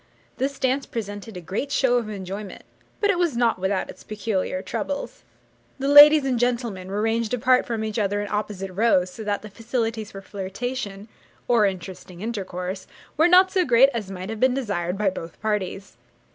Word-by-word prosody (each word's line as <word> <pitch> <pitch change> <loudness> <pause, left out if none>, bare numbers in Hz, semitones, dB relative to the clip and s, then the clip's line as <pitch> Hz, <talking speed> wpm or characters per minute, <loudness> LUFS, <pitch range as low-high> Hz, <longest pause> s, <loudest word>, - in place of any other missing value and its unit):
This 275 +1 -2
dance 265 +1 0
presented 205 -2 -6
a - - -7
great 200 - -4
show 260 -3 +3
of 230 -3 -2
enjoyment, 195 0 -7 0.4
but 410 -1 +3
it 360 - -1
was 335 -9 +1
not 235 -5 +2
without 190 +1 -1
its - - -12
peculiar 200 -3 -2
troubles. 260 +5 -4 0.6
The 275 0 -2
ladies 290 0 +9
and 255 -3 0
gentlemen 235 -6 -1
were 205 +2 -1
ranged 225 +1 0
apart 255 +1 +3
from 225 -2 -2
each 220 0 -2
other 205 0 0
in 205 - -3
opposite 205 -2 -3
rows, 185 -3 +2
so 220 - -8
that 205 -1 -2
the 215 - -8
facilities 225 0 -3
for 195 0 -9
flirtation, 200 +1 -5 0.4
or 230 -4 +4
interesting 185 -1 -7
intercourse, 190 -4 -4 0.3
were 320 +2 +5
not 370 +1 +6
so 375 -2 +2
great 255 -1 +6
as 215 -5 -4
might 190 +2 -6
have 225 - -5
been 255 +1 +3
desired 195 -8 -2
by 200 -2 +1
both 165 -2 -8
parties. 200 -2 -3
215 Hz, 185 wpm, -24 LUFS, 195-250 Hz, 0.6 s, ladies